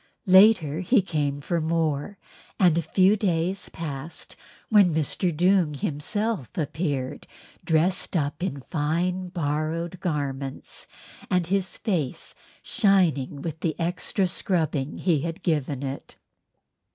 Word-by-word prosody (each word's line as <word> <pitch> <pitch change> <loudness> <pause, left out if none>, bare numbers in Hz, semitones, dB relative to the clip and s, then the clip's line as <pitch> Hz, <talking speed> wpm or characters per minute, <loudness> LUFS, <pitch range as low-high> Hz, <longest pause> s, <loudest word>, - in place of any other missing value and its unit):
Later 185 -5 +6
he 195 +4 +3
came 145 -5 -1
for 170 +3 -1
more 160 +2 -1 0.4
and 175 -4 +5
a 170 - +2
few 190 +5 +3
days 185 -2 -1
passed 155 0 -6 0.3
when 200 -7 +5
Mr. 160 +4 0
Doong 175 -1 +2
himself 165 - -2
appeared 145 -4 -2 0.4
dressed 175 +3 +2
up 145 +2 -2
in 165 -7 -3
fine 175 +6 -1
borrowed 165 +1 -2
garments, 140 -6 -4 0.4
and 180 -1 +2
his 190 +1 -1
face 165 - -2 0.3
shining 160 -9 +2
with 160 -2 -4
the 160 -1 -2
extra 180 +3 0 0.2
rubbing 155 -5 0
he 170 -5 +2
had 165 +2 -5
given 145 -4 -1
it. 135 0 -6
165 Hz, 115 wpm, -25 LUFS, 150-185 Hz, 0.4 s, Later